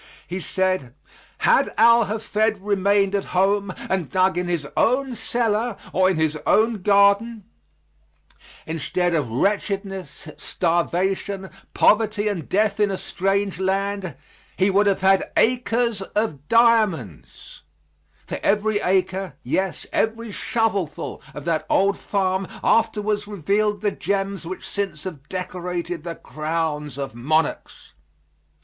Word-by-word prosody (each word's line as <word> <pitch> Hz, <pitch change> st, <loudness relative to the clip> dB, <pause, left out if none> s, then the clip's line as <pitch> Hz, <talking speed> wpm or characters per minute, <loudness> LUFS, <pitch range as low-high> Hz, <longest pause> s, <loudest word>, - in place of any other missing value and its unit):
He 180 Hz, +2 st, -4 dB
said, 185 Hz, -9 st, -1 dB, 0.5 s
had -, -, +4 dB
Al 235 Hz, -1 st, +6 dB
Hafed 220 Hz, 0 st, 0 dB
remained 200 Hz, 0 st, +1 dB
at 200 Hz, -1 st, 0 dB
home 200 Hz, +1 st, +2 dB, 0.2 s
and 185 Hz, -7 st, -1 dB
dug 185 Hz, +5 st, +2 dB
in 180 Hz, 0 st, -1 dB
his 170 Hz, -5 st, -2 dB
own 260 Hz, +2 st, +2 dB
cellar 230 Hz, -1 st, -1 dB, 0.2 s
or 185 Hz, 0 st, +4 dB
in 185 Hz, -, 0 dB
his 155 Hz, -1 st, 0 dB
own 220 Hz, -1 st, +3 dB
garden, 200 Hz, +3 st, +3 dB, 1.2 s
instead 170 Hz, +3 st, -1 dB
of 150 Hz, -7 st, 0 dB
wretchedness, 195 Hz, -, -2 dB
starvation, 185 Hz, +3 st, -1 dB, 0.2 s
poverty 215 Hz, -1 st, +3 dB
and 185 Hz, -8 st, -3 dB
death 210 Hz, +1 st, +1 dB
in 210 Hz, -1 st, +3 dB
a 195 Hz, -, -2 dB
strange 195 Hz, 0 st, -1 dB
land, 195 Hz, -3 st, -1 dB, 0.4 s
he 190 Hz, +1 st, +3 dB
would 205 Hz, +2 st, +3 dB
have 195 Hz, -1 st, +1 dB
had 190 Hz, 0 st, +3 dB
"acres 235 Hz, -3 st, +2 dB
of 190 Hz, -8 st, -3 dB
diamonds" 215 Hz, -, +1 dB, 0.6 s
for -, -, -5 dB
every 210 Hz, +1 st, +1 dB
acre, 190 Hz, -3 st, 0 dB
yes, 190 Hz, +8 st, -2 dB
every 225 Hz, 0 st, -1 dB
shovelful 205 Hz, -8 st, -2 dB
of -, -, -7 dB
that 165 Hz, -2 st, 0 dB
old 200 Hz, +1 st, +3 dB
farm 190 Hz, -1 st, -1 dB, 0.2 s
afterwards 210 Hz, -2 st, +1 dB
revealed 205 Hz, +2 st, 0 dB
the 210 Hz, -1 st, +1 dB
gems 195 Hz, -3 st, -2 dB
which 185 Hz, -, -6 dB
since 190 Hz, -7 st, -3 dB
have 150 Hz, -7 st, -8 dB
decorated 180 Hz, -2 st, -4 dB
the 170 Hz, -1 st, -5 dB
crowns 155 Hz, -3 st, -3 dB
of 140 Hz, -3 st, -4 dB
monarchs. 150 Hz, +6 st, -2 dB
195 Hz, 125 wpm, -22 LUFS, 175-210 Hz, 1.2 s, Al